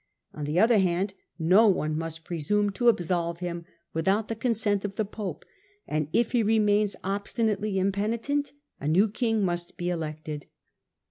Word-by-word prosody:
On 150 - -5
the 150 +4 +1
other 225 0 +5
hand, 190 +1 +1 0.2
no 185 +7 +5
one 155 -6 +1
must 165 0 -4
presume 200 +6 0
to 240 +5 0
absolve 175 -5 +2
him 170 -1 -5 0.3
without 195 +7 +1
the 225 - -2
con 230 +1 0
sent 205 -2 +1
of 200 -1 -4
the 215 - 0
pope, 195 -5 -6 0.4
and, 155 -1 -1
if 235 - +2
he 245 - +3
remains 210 -1 +3
obstinately 205 +1 -1
impeni 200 +4 0
tent, 285 +4 -1 0.3
a 145 - -4
new 185 +8 +4
king 220 -1 0
must 175 -1 -3
be 175 -1 -2
elected. 155 -3 -5
195 Hz, 170 wpm, -27 LUFS, 170-215 Hz, 0.4 s, other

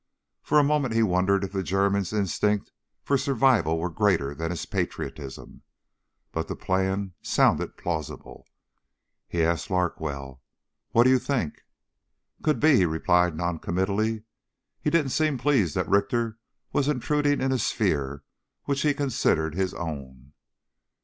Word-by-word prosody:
For - - +2
a 150 - +6
moment 140 -5 +1
he 115 - +4
wondered 95 0 +2
if 95 - -4
the 95 -1 -1
German's 95 0 +1
instinct 105 0 0 0.3
for 140 -1 +1
survival 130 - +2
were 85 +2 -2
greater 85 -8 +1
than 80 +3 -4
his 85 -2 -4
patriotism. 70 -4 -5 0.7
But 80 - -3
the - - -4
plan 95 +1 -1
sounded - - +2
plausible. 80 -4 -5 0.8
He 85 -1 0
asked 85 0 0
Larkwell: 75 -7 -2 0.5
"What 115 - +5
do 130 - +5
you 130 - +5
think?" 120 - -2 0.8
"Could 155 -1 +1
be," 150 -3 +5
he 95 - +4
replied 90 +1 +2
noncommittally. 95 +6 -1 0.6
He - - +1
didn't 150 -6 +2
seem 155 -1 +1
pleased 125 - +2
that - - 0
Richter 115 +2 +1 0.3
was 145 - +1
intruding 145 +1 +1
in 135 - 0
a 130 - +1
sphere 70 - -1 0.4
which 140 -1 -1
he 145 -1 +2
considered 125 - +1
his 95 +1 -1
own. 70 -5 -7
95 Hz, 140 wpm, -26 LUFS, 80-130 Hz, 0.8 s, a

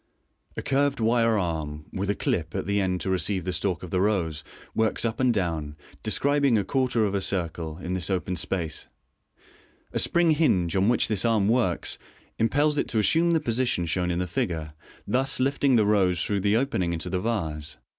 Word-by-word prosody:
A - - -3
curved 140 0 +1
wire 115 0 +3
arm, 80 -5 -3
with 100 +1 -2
a 100 - +1
"clip" 80 -4 -2
at - - -2
the 100 0 +1
end 90 -1 -1
to - - -2
receive 95 0 0
the 90 - -2
stalk 90 +1 -1
of 90 - -8
the 90 - +1
rose, 90 -7 0 0.3
works 110 +1 +1
up 115 0 -2
and 130 -1 +3
down, 80 -8 -2 0.3
describing 140 -4 +2
a 100 - +1
quarter 125 -1 +1
of 100 - -1
a 100 - 0
circle, 85 -4 -2
in 90 0 -5
this 90 0 -1
open 90 -1 -1
space. 85 -2 -3 1.1
A - - 0
spring 170 -1 +3
hinge, 95 - +2
on 95 +3 +3
which 120 - +3
this 105 -4 0
arm 110 -4 +2
works, 115 -6 0 0.4
impels 145 +6 +2
it - - 0
to 115 - -1
assume 165 +11 +3
the 165 -1 +3
position 120 - 0
shown 90 +1 -1
in 85 - -1
the 90 - -1
figure, 80 -3 -3 0.3
thus 135 +2 +1
lifting 135 0 +2
the 110 -3 +4
rose 95 -4 +2
through 100 -1 0
the 100 +3 +2
opening 95 -10 0
into 85 +1 -4
the 90 - 0
vase. 80 -9 -3
100 Hz, 195 wpm, -26 LUFS, 85-120 Hz, 1.1 s, the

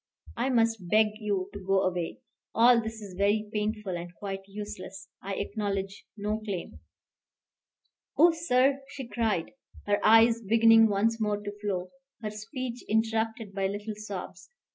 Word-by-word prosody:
I 245 +3 0
must 225 -7 +1
beg 215 +1 +5
you 200 -3 -2
to 200 - -6
go 195 0 +2
away. 180 -2 -2 0.3
All 235 +1 +6
this 220 -1 -6
is 195 -2 -9
very 205 +2 +1
painful 210 -3 -2
and 175 0 -6
quite 195 0 -5
useless. 195 -1 -8
I 195 0 -4
acknowledge 195 -1 -3
no 210 +1 -2
claim." 200 -5 -6 1.4
"Oh, 340 +3 +7
sir," 275 -4 +2
she 275 -3 -8
cried, 220 -8 -1 0.3
her 205 0 +2
eyes 225 +1 +6
beginning 225 +1 +6
once 220 +2 +1
more 210 -1 0
to 205 0 -5
flow, 185 -3 -2 0.3
her 215 - -2
speech 235 +3 -6
interrupted 220 -1 0
by 195 0 0
little 205 +2 -4
sobs. 205 - -7
210 Hz, 145 wpm, -28 LUFS, 195-225 Hz, 1.4 s, Oh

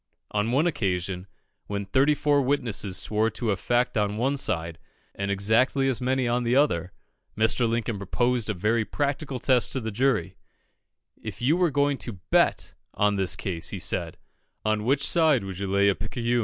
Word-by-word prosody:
On 105 +2 0
one 140 +6 +2
occasion, 95 - -2 0.4
when 100 -1 -3
thirty 135 +9 +3
four 145 -1 +2
witnesses 125 -8 0
swore 110 +3 +1
to 115 -1 -2
a - - +1
fact 120 +4 0
on 105 0 -1
one 135 +5 +1
side, 85 - -2 0.3
and 100 0 -3
exactly 110 +7 +2
as 130 -2 0
many 130 0 +1
on 120 +1 +1
the 120 +1 +1
other, 95 - +2 0.5
Mr. 110 +2 +2
Lincoln 115 -2 -2
proposed 120 +3 0
a 105 - -1
very 110 +5 +1
practical 140 +2 -2
test 125 0 +1
to 135 - 0
the 110 -2 -4
jury 110 -5 0 0.8
"If - - -7
you 135 +7 +2
were 180 -1 +2
going 145 -1 +1
to 120 - -4 0.2
bet - - +2 0.2
on 105 0 +2
this 95 -2 0
case," 90 -5 -3
he - - -4
said, - - -2 0.5
"on 110 0 0
which 135 +2 +2
side 155 - +3
would 95 -1 -6
you 100 - -3
lay 100 +1 +3
a 100 - +4
picayune?" 120 +4 -2
115 Hz, 185 wpm, -26 LUFS, 100-135 Hz, 0.8 s, a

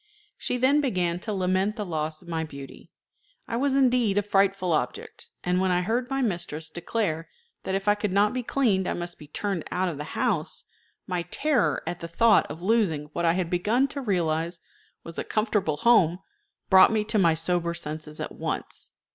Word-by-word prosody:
She 250 - -2
then 270 +4 +4
began 180 -10 0
to 215 - -4
lament 190 +1 0
the 210 - -4
loss 155 -1 -3
of - - -18
my 165 -1 -2
beauty. 140 -3 -10 0.6
I 230 - -3
was 270 +2 +1
indeed 245 -6 +3
a 205 - +3
frightful 195 -3 +2
object; 125 -5 -3
and 180 +1 +1
when 190 - +2
I 180 0 +2
heard 240 +6 -1
my 270 -1 0
mistress 170 -6 -2
declare 170 -2 -2 0.4
that 190 - -1
if 195 +1 -3
I 205 - +6
could 205 -1 -2
not 205 +2 +3
be 255 - -1
cleaned 225 -7 +1
I - - -1
must 175 0 -6
be 150 - -12
turned 190 +2 -3
out 185 0 0
of 160 - -5
the 150 - -6
house, 205 -12 -1 0.4
my 180 -2 -2
terror 270 - 0
at 175 - -4
the 170 - -6
thought 220 +6 +4
of 160 +4 -8
losing 180 -9 +1
what 170 - -1
I 165 - +4
had 180 -2 -2
begun 215 +9 +2
to 280 - -5
realize 170 -5 -1 0.4
was 165 - -7
a - - -1
comfortable 210 -8 0
home 180 -5 +4 0.5
brought 190 +2 +7
me 220 -1 +1
to 215 0 0
my 165 -4 +4
sober 170 +1 0
senses 150 -1 -6
at - - -4
once. - - -4
185 Hz, 195 wpm, -26 LUFS, 165-220 Hz, 0.6 s, brought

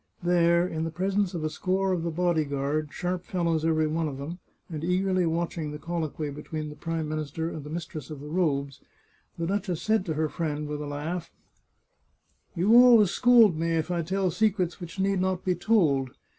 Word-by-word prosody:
There, 170 0 +3
in 160 -2 -3
the 165 - -2
presence 190 +3 -1
of 165 - -3
a 155 - 0
score 190 +3 0
of 180 -2 0
the 170 - -2
body 170 -1 +1
guard, 145 +1 -2
sharp 180 0 -3
fellows 170 -4 -1
every 160 -1 +2
one 160 +1 -1
of 140 -3 -5
them, 155 +6 -6 0.3
and 155 -2 -6
eagerly 185 0 +1
watching 165 -1 -2
the 150 - -6
col 170 +2 -3
loquy 150 0 -5
between 150 +1 -5
the 150 - -9
Prime 165 +1 -3
Minister 155 +2 -3
and 155 - -6
the 150 - -9
mistress 155 -3 -6
of 150 -3 -7
the 145 - -9
robes, 145 -5 -1 0.6
the 165 - -2
duchess 190 -2 -1
said 220 -2 +2
to 160 - -1
her 155 +1 +1
friend, 150 -2 -3
with 150 0 -4
a 150 - -5
laugh: 160 +4 -4 0.6
" - - -43
You 195 +7 +4
always 230 -6 +6
scold 235 -7 +6
me 165 +1 -1
if 165 +2 -1
I 175 -1 0
tell 185 +2 0
secrets 185 -2 0
which 175 +2 -8
need 195 -1 +1
not 185 -1 -1
be 185 - +2
told. 170 - +2
165 Hz, 205 wpm, -27 LUFS, 155-180 Hz, 0.6 s, always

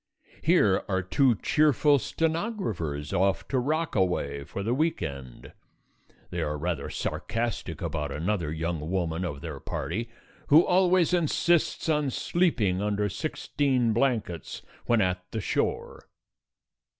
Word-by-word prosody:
Here - - +3
are 95 -1 0
two 125 +6 +3
cheerful 145 +4 +3
stenographers 145 - -2
off 95 +1 +1
to 130 - +1
Rockaway 95 - 0
for 100 +5 -5
the 115 +4 0
week 155 +5 0
end. 65 -3 -7 0.8
They - - -2
are 75 0 -2
rather 80 -2 -3
sarcastic 115 -6 -3
about 75 -3 -3
another 80 +1 -1
young 80 -1 -3
woman 85 -2 -1
of 70 -6 -4
their 80 -5 -6
party 115 +12 -4 0.4
who 155 +3 +7
always 180 -1 +3
insists 170 0 +2
on 150 -3 +2
sleeping 120 - +1
under 105 0 0
sixteen 130 - 0
blankets 110 - -1 0.2
when 120 -2 +3
at 90 -1 0
the 110 - -3
shore. 100 - -2
105 Hz, 125 wpm, -27 LUFS, -, 0.8 s, who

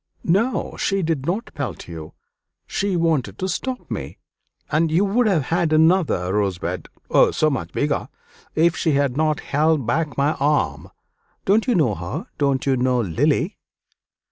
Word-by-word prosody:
"No, 210 +9 0
she 195 -1 0
did 155 -4 -1
not 205 +7 -2
pelt 130 - -5
you; 80 -2 -8 0.5
she 200 -1 -1
wanted 150 - 0
to 185 - -2
stop 255 +6 -4
me, - - -5 0.5
and 160 +1 +2
you 175 +6 +3
would 225 +4 +2
have 175 -8 +2
had 170 -2 +1
another 155 - +3
rosebud 90 -3 -2 0.2
oh, - - +6
so 155 -1 +1
much 135 - -3
bigger! 145 0 -1 0.5
if 165 +1 +3
she 160 - +1
had 140 -2 +1
not 155 0 +1
held 150 -2 +1
back 150 +4 -1
my 140 +2 +2
arm. 140 - 0 0.6
Don't 215 +5 +3
you 245 - +3
know 145 - +3
her 85 -1 -5
don't 140 -2 +1
you 135 -1 +3
know 125 0 +1
Lily?" 90 -8 0
150 Hz, 160 wpm, -22 LUFS, 125-170 Hz, 0.6 s, oh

